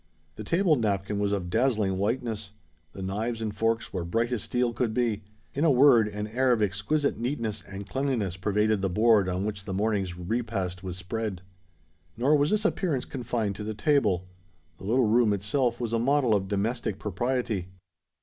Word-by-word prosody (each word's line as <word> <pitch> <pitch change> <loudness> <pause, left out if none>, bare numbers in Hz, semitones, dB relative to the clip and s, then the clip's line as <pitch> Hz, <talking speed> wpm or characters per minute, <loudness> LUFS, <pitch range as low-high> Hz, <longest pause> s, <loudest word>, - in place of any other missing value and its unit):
The 110 - -7
table 170 - +3
napkin 100 -2 -1
was 100 -1 +1
of 90 -4 -2
dazzling 110 -5 +2
whiteness: 110 -1 -2 0.4
the 95 - -7
knives 110 +5 -2
and 110 -2 -3
forks 115 +2 0
were 90 -3 -2
bright 115 +8 0
as 120 -4 -1
steel 125 +1 0
could 115 -2 -1
be;—in 110 +3 -3
a 165 - +5
word, 125 -5 +6
an 105 0 -4
air 125 +4 +1
of 115 -3 +3
exquisite 105 +8 0
neatness 115 -4 -2
and 100 0 -7
cleanliness 125 -10 -1
pervaded 105 +2 +1
the 95 - 0
board 105 0 +4
on 90 +2 -1
which 100 -2 -4
the 95 - -3
morning's 100 -4 0
repast 95 -2 -2
was 90 -1 -5
spread. 95 0 -4 0.7
Nor 135 +6 +4
was 145 0 +3
this 215 0 +1
appearance 170 - 0
confined 120 -6 -2
to 105 - -5
the 110 0 -4
table. 105 - +2 0.5
The 95 - -9
little 120 +4 +3
room 110 -1 +4
itself 120 +5 0
was 115 -2 -3
a 115 - +2
model 130 -1 +3
of 95 -2 +1
domestic 105 +1 -1
propriety. 105 -1 -2
110 Hz, 180 wpm, -27 LUFS, 100-120 Hz, 0.7 s, word